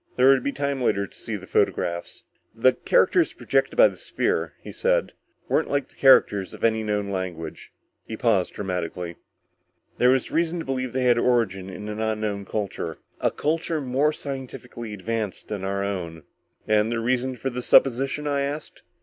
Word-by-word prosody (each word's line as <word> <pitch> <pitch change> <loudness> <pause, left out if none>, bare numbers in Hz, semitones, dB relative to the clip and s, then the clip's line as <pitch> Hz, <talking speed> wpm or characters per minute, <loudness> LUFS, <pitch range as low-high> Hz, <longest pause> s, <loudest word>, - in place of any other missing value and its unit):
There 130 +1 +5
would 135 -2 +5
be 140 - 0
time 140 -1 -2
later 100 -4 +1
to - - -16
see - - -5
the - - -7
photographs. 85 0 -1 0.3
"The 130 +3 +4
characters 375 -8 +3
projected - - 0
by - - +8
the - - -7
sphere," - - -1
he - - -9
said, - - +1 0.3
"weren't - - +1
like 140 -2 -1
the - - -21
characters 105 -7 +4
of - - -13
any 110 -1 +3
known 105 -2 -1
language." 90 -4 -5 0.4
He 110 - -5
paused 105 -7 +1
dramatically. 90 -3 -4 0.8
"There 125 - +5
was 130 -1 +2
reason 170 +1 +1
to 165 - -4
believe 130 -2 -2
they 130 0 0
had 120 -1 +4
origin 110 -7 +1
in 95 +3 -7
an 105 0 -5
unknown 110 -2 -2
culture. 105 0 -4 0.2
A - - +2
culture 160 +1 -1
more 140 +2 +1
scientifically 130 -5 -7
advanced 105 0 -4
than 105 -3 -4
our 100 +1 -1
own." 85 -5 -4 0.4
"And 110 +1 +3
the 120 - 0
reasons 125 +2 0
for 135 +3 -3
this 125 0 -4
supposition?" 135 +3 +4
I 140 -1 0
asked. 145 +2 -4
120 Hz, 175 wpm, -25 LUFS, 100-135 Hz, 0.8 s, by